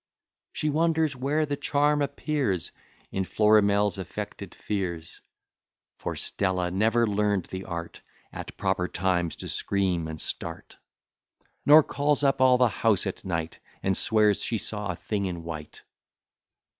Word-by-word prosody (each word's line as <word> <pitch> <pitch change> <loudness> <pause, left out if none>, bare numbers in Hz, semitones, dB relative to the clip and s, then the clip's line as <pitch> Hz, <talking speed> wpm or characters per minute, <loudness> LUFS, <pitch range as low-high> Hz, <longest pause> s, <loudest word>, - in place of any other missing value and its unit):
She 150 - -1
wonders 160 -1 +1
where 145 +5 0
the 145 -1 -2
charm 145 +1 +1
appears 140 - -1 0.4
In 95 - -1
Florimel's 105 0 +3
affected 95 - -6
fears; 85 -5 -4 0.8
For - - -4
Stella 90 -2 -1
never 110 +5 +2
learn'd 105 -2 +1
the 95 0 -5
art 85 -1 -6 0.3
At - - -8
proper 95 -1 0
times 90 -3 0
to - - -7
scream 95 -5 0
and 80 -1 -6
start; - - -6 0.9
Nor 150 +2 +9
calls 145 +1 0
up 135 -1 +2
all 130 -1 +6
the 125 0 +5
house 110 -2 +2
at 95 - -4
night, 80 -3 -3 0.2
And 95 0 +1
swears 105 -1 +3
she 115 - 0
saw 105 +1 -3
a 90 - -2
thing 100 +2 -2
in 85 -2 -5
white. 80 -2 -8
100 Hz, 140 wpm, -27 LUFS, 90-130 Hz, 0.9 s, Nor